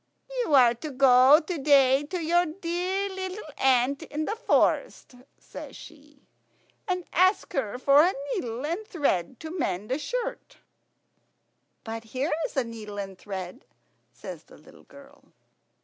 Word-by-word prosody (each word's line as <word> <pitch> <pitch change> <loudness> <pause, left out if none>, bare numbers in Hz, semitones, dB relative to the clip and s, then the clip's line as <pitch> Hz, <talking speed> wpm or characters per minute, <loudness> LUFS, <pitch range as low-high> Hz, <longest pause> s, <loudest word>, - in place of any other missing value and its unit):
"You 315 -11 +2
are 245 -3 +6
to 300 +6 -7
go 265 +1 +6
to 340 +1 -5
day 270 -1 +5
to 360 +5 -4
your 345 +2 +2
dear 360 +3 -2
little 380 0 -6
aunt 265 +1 +2
in 310 +1 -4
the 430 - -2
forest," 460 - 0 0.2
says - - -11
she, 295 -2 -15 0.6
"and 365 -1 -1
ask 370 +4 +2
her 250 -4 -2
for 275 +3 +5
a 365 +3 +2 0.2
needle 240 +3 -4
and 340 +8 -3
thread 265 - -1
to 320 +2 -7
mend 200 - -2
a 265 - 0
shirt." - - -5 1.3
"But 225 0 -6
here 260 +8 -2
is - - -14
a 265 - +3
needle 220 -3 -9
and 195 -1 -5
thread," 190 - -7 0.5
says - - -10
the - - -17
little - - -18
girl. 280 0 -17
280 Hz, 150 wpm, -26 LUFS, 245-345 Hz, 1.3 s, are